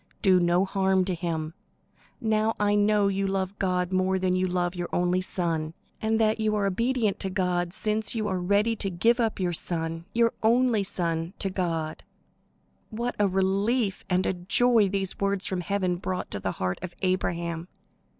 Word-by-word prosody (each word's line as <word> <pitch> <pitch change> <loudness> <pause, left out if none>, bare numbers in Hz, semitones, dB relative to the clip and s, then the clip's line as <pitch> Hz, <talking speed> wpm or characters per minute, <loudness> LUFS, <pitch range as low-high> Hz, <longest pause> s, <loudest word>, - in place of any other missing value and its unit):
Do 190 -3 +5
no 175 +2 +3
harm 190 -1 +1
to 185 - -1
him. 160 -2 -3 0.7
Now 220 0 +1
I 205 0 +2
know 205 0 +3
that 200 - +1
you 195 0 0
love 195 0 -2
God 180 -1 0
more 185 0 +2
than 185 -1 +1
you 185 0 +1
love 175 -1 -1
your 175 -1 -4
only 180 +1 +1
son, 165 -4 -2 0.3
and 220 0 +1
that 220 0 +2
you 215 -1 +1
are 205 -1 +1
obedient 230 +2 0
to 190 - -2
God, 180 -2 0
since 215 +2 -1
you 215 -2 -1
are 190 -2 -1
ready 205 +5 +2
to 195 - -1
give 225 +7 +2
up 225 -4 0
your 180 -2 0
son, 165 0 -2
your 230 +1 +2
only 235 0 +3
son, 170 -1 -2
to 195 - -1
God." 165 -4 -2 0.9
What 235 +3 -3
a 205 - +4
relief 195 +3 +1
and 185 0 +2
a - - +1
joy 205 +4 +3
these 195 -1 -2
words 200 -1 0
from 185 -2 -1
heaven 185 -1 -1
brought 185 0 -4
to 100 - -3
the 95 -1 -2
heart 90 0 -2
of 175 -1 -7
Abraham! 170 -2 -1
190 Hz, 185 wpm, -26 LUFS, 175-210 Hz, 0.9 s, Do